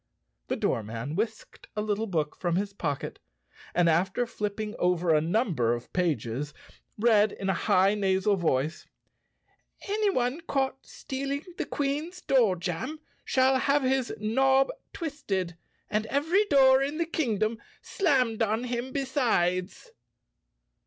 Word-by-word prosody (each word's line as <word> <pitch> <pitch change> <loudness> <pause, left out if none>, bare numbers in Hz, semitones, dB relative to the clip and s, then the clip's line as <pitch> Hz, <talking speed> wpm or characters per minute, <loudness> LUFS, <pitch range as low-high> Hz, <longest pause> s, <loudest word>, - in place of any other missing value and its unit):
The - - -1
doorman 115 +5 -2
whisked 220 +3 -4
a 210 - -1
little 215 +1 -1
book 155 -6 -1
from 175 -2 -1
his 200 +2 -1
pocket 145 -8 -3 0.6
and, 175 -1 +4
after 185 +8 +2
flipping 210 -1 -4
over 180 -2 +2
a 155 - +4
number 160 - +1
of 120 - -10
pages, 145 -5 -1 0.4
read 215 -2 +4
in 195 -1 -1
a - - +1
high 190 +2 +3
nasal 195 0 +2
voice, 160 -3 -1 1.0
"Any 415 +1 +1
one 255 -1 0
caught 270 -1 -1
stealing 275 +2 -4 0.2
the - - -2
Queen's 295 +6 -2
door 235 - +3
jam 175 - -4 0.3
shall 260 0 +3
have 280 +1 +2
his 260 -1 +1
knob 265 +5 +3 0.2
twisted 195 - -3 0.3
and 215 +1 -1
every 325 - +2
door 265 -5 +5
in 285 +3 -1
the 335 - +1
kingdom 225 -9 -1 0.2
slammed 255 - +1
on 220 +2 +1
him 245 +1 -3
besides." 245 - 0
215 Hz, 130 wpm, -28 LUFS, 180-270 Hz, 1.0 s, door